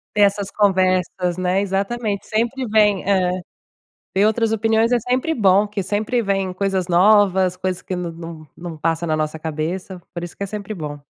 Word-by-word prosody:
Essas 200 -1 +2
conversas, 185 -3 +1
né? 185 +1 +1
Exatamente, 200 +2 -2
sempre 235 +4 -1
vem, 210 -2 +3
eh 185 -2 +1 0.8
ver 195 - +4
outras 220 +1 +2
opiniões 225 +1 +2
é 245 - +4
sempre 255 +7 -1
bom, 200 -3 +4
que 205 -1 -3
sempre 215 +5 -1
vem 195 -2 0
coisas 190 -1 -1
novas, 190 0 +4
coisas 185 0 -3
que 185 - -4
não 180 -1 -3
não 165 -2 -9
não 170 -2 -8
passa 165 +2 -1
na 155 - 0
nossa 155 0 -2
cabeça. 165 +4 -4
Por 170 -1 -4
isso 175 - -9
que - - -6
é - - -4
sempre 210 +1 -6
bom. 150 -6 -6
190 Hz, 180 wpm, -20 LUFS, 180-210 Hz, 0.8 s, ver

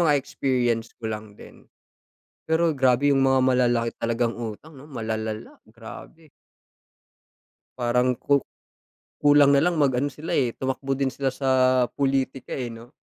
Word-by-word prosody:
mga 145 - +4
experience 125 -4 -1
ko 110 -1 -5
lang 105 -1 -8
din. - - -16 0.8
Pero 160 +1 +2
grabe 135 0 +2
yung 135 - +3
mga 130 0 +3
malalaki 120 -2 +2
talagang 115 0 0
utang 115 +7 -7
'no, 145 - -13
malalala, 110 -4 -5
grabe. 120 +7 -13 1.5
Parang 125 +1 +1
ku 140 -1 +2 0.8
kulang 145 -1 +5
na 140 - +5
lang 175 +3 +1
mag 140 -3 +3
ano 135 +4 0
sila, 155 +3 -7
eh, 125 -4 0
tumakbo 135 +1 -2
din 135 -1 -1
sila 135 0 -1
sa 135 0 -3 0.4
pulitika, 135 -1 -1
eh, 125 -3 -4
'no? 115 +1 -12
130 Hz, 145 wpm, -24 LUFS, 115-140 Hz, 1.5 s, kulang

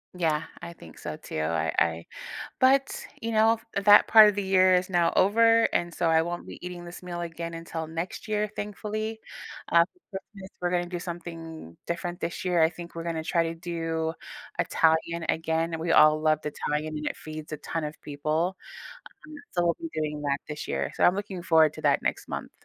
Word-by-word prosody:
Yeah, 160 -3 +1 0.2
I 170 - -7
think 85 - -14
so - - -5
too. - - -6
I 80 -1 0
I 85 0 0 0.5
but, 270 +1 +3 0.2
you 230 - -2
know, 220 0 +4 0.2
that 205 +1 +7
part 220 -1 +9
of 210 - +1
the 205 - -1
year 185 -1 +4
is 180 +1 +1
now 175 -2 +3
over, 230 +3 +5
and 175 -1 -1
so 170 - +1
I 160 0 +4
won't 175 +1 -5
be - - -8
eating 175 -1 -7
this 175 0 -9
meal 175 -1 -6
again 170 0 -5
until 165 -1 -5
next 165 +3 -5
year, 210 -1 0
thankfully. 215 +1 -4 0.5
Um, 170 0 +6 0.3
for 190 - -4
Christmas, 195 -2 -11
we're 175 0 0
gonna 175 0 0
do 175 0 -4
something 165 - -8
different 175 +1 -3
this 170 - -4
year. 180 -2 +2
I 160 0 +5
think 170 0 -10
we're 165 - -4
gonna 165 -2 -2
try 165 +1 +1
to 165 0 -3
do 165 -1 -3 0.5
Italian 165 +1 +2
again. 160 0 0
We 165 +1 -1
all 155 -1 +6
loved 155 0 +2
Italian, 150 +1 -2
and 150 - -4
it - - -2
feeds 155 0 -8
a - - -2
ton 160 +2 -3
of 150 0 -4
people. 155 +5 -1 0.7
Um, 305 - -10 0.2
so 175 - +1
we'll 170 - +2
be 330 - -4
doing 150 -1 -2
that 140 -1 0
this 150 0 -6
year. - - -1
So - - 0
I'm 180 - +6
looking 195 -3 -5
forward 160 -2 +5
to 155 - -9
that 145 -2 +3
next - - -2
month. - - -5
170 Hz, 205 wpm, -27 LUFS, 160-185 Hz, 0.7 s, part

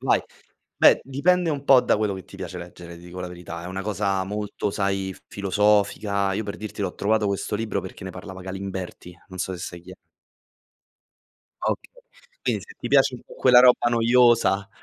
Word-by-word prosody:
Vai. - - +2 0.5
Beh, - - +6
dipende 170 +6 +1
un 140 -2 -3
po' 135 -3 +7
da - - +2
quello 105 -2 0
che 95 - -8
ti - - -13
piace 90 - -6
leggere, 85 -1 -10
ti 85 - -14
dico 90 +1 -9
la 90 - -4
verità. 85 -1 -8
È - - -6
una 95 +1 -4
cosa 100 -1 -1
molto, 105 0 -3
sai, 95 -2 -1
filosofica. 100 0 +1
Io 110 - -2
per 100 - -5
dirti 105 -1 -6
l'ho 95 -2 -2
trovato 105 +1 +1
questo 100 +1 -2
libro 110 0 -2
perché 95 0 -9
ne 95 - -5
parlava 95 +1 -9
Galimberti, 95 -2 -6
non 95 -1 -10
so 95 0 -3
sai 90 -1 -7
chi 90 - -14
è. 95 - -12 1.7
Okay. - - -2 0.5
Quindi - - 0
se 455 - -13
ti - - -5
piace - - +4
un - - -10
po' - - -14
quella 125 - +6
roba 125 -1 +5
noiosa. 115 -4 +4
100 Hz, 190 wpm, -24 LUFS, 95-110 Hz, 1.7 s, po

